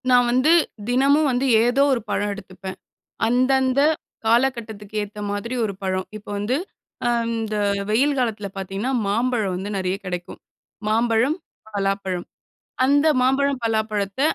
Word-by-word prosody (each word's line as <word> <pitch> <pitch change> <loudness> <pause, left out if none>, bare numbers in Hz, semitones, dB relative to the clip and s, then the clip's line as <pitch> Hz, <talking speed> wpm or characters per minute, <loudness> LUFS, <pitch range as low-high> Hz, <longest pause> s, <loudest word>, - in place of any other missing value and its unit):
நா 250 - +6
வந்து 255 +6 +3 0.4
தினமும் 280 +4 +4
வந்து 250 +2 0 0.2
ஏதோ 245 +3 +3
ஒரு 240 - -1
பழம் 205 0 0
எடுத்துப்பேன். 190 -1 -9 0.5
அந்தந்த 260 +2 +3 0.5
காலகட்டத்துக்கு 225 -3 0
ஏத்த 205 +1 -7
மாதிரி 205 +5 -3
ஒரு 210 - -2
பழம். 185 -1 -1
இப்போ 210 -1 -10
வந்து, 215 +6 0 0.5
அந்த 230 -2 -1 0.4
வெயில் 275 +6 +3
காலத்தில 220 -5 -1
பார்த்தீங்கன்னா, 195 +6 -3
மாம்பழம் 220 -2 0
வந்து 195 +3 -4
நெறைய 185 0 -1
கெடைக்கும். 180 -1 -5 0.5
மாம்பழம், 230 +6 +2 0.4
பலாப்பழம். 195 -2 -1 0.6
அந்த 285 +3 +4
மாம்பழம், 270 +1 +2
பலாப்பழத்த 215 -1 -1
225 Hz, 120 wpm, -22 LUFS, 200-255 Hz, 0.6 s, நா